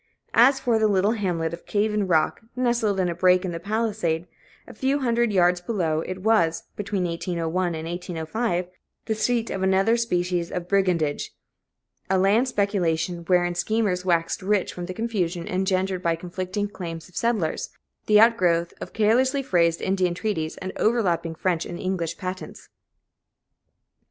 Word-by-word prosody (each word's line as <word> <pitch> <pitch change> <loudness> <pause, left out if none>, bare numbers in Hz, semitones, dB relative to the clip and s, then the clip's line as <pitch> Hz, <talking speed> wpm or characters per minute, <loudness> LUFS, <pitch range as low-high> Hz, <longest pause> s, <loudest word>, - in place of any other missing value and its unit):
As 265 +4 +6
for 240 -4 +1
the 220 - +4
little 200 0 +2
hamlet 175 -7 -1
of 170 - -9
Cave 210 +1 +1
in 210 -2 0
Rock, 160 +1 +2
nestled 235 -5 +1
in 185 - +2
a 175 - -1
break 180 +2 +3
in 180 - -2
the 165 - -4
palisade, 200 -5 -1 0.4
a - - -10
few 270 +2 0
hundred 235 -2 +1
yards 180 -2 +3
below, 175 -6 -1
it 185 +2 -6
was, 190 -7 +2
between 200 -2 -2
1801 170 0 -2
and 160 0 -5
1805, 175 +3 -2 0.4
the 220 - 0
seat 230 +1 0
of 190 - -3
another 190 +4 +3
species 180 -6 -1
of 175 -1 -4
brigandage 180 -7 0 0.7
a 190 - +3
land 205 +7 +3
speculation, 180 -7 0
wherein 175 -1 +2
schemers 185 0 0
waxed 170 0 0
rich 200 0 0
from 175 -1 -6
the 185 - -5
confusion 185 -7 -2
engendered 185 0 0
by 170 -2 +1
conflicting 185 +4 -4
claims 165 -5 -7
of 180 - -21
settlers, 220 -9 -1 0.4
the 210 0 +6
outgrowth 180 -7 +3
of - - -7
carelessly 255 +6 +2
phrased 170 -7 +2
Indian 185 -2 +1
treaties 170 -6 -2
and 185 0 -6
overlapping 180 -8 +1
French 170 -1 0
and 175 - -6
English 175 -3 -2
patents. 185 0 -7
185 Hz, 155 wpm, -24 LUFS, 175-215 Hz, 0.7 s, As